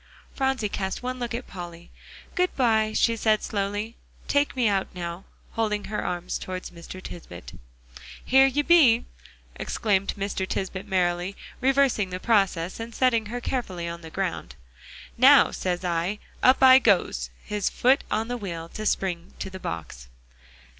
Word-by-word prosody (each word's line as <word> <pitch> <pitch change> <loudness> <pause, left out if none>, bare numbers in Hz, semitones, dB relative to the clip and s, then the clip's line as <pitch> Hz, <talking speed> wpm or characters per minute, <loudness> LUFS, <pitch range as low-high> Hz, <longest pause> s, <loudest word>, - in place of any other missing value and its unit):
Phronsie 265 -5 0
cast 190 +2 -4
one 255 0 -3
look 240 -1 -3
at 245 - -5
Polly. 175 -2 -9 0.4
"Good 360 0 0
by," 220 -4 +2
she 230 +1 +2
said 215 -1 +2
slowly. 205 +2 -3 0.3
"Take 285 0 +1
me 250 -3 +2
out 195 -2 +1
now," 175 +1 -5 0.3
holding 210 -2 -1
her 210 - -3
arms 175 0 -3
towards 185 0 -6
Mr. 170 +2 -10
Tisbett. 90 - -10 0.7
"Here 265 +1 +6
you 290 +2 0
be!" 280 -9 +5 0.5
exclaimed 200 -3 0
Mr. 195 -1 -2
Tisbett 190 +1 -4
merrily, 180 0 0 0.3
reversing 265 -7 +2
the 180 0 -5
process, 190 -5 +1
and 230 0 -7
setting 230 -4 +2
her 240 +3 -4
carefully 195 -9 -3
on 170 0 -6
the 160 - -9
ground. 170 - -4 0.6
"Now, 270 +3 +7
says 180 0 -2
I; 175 +4 -1 0.2
up 260 +1 +5
I 260 0 +9
goes," 175 - +2 0.2
his 210 -1 -1
foot 260 +3 +3
on 220 +1 -1
the 245 0 -3
wheel 170 -6 -6
to 215 +3 -4
spring 175 -4 -2
to - - -6
the 190 - -8
box. 80 - -6
205 Hz, 155 wpm, -25 LUFS, 180-240 Hz, 0.7 s, I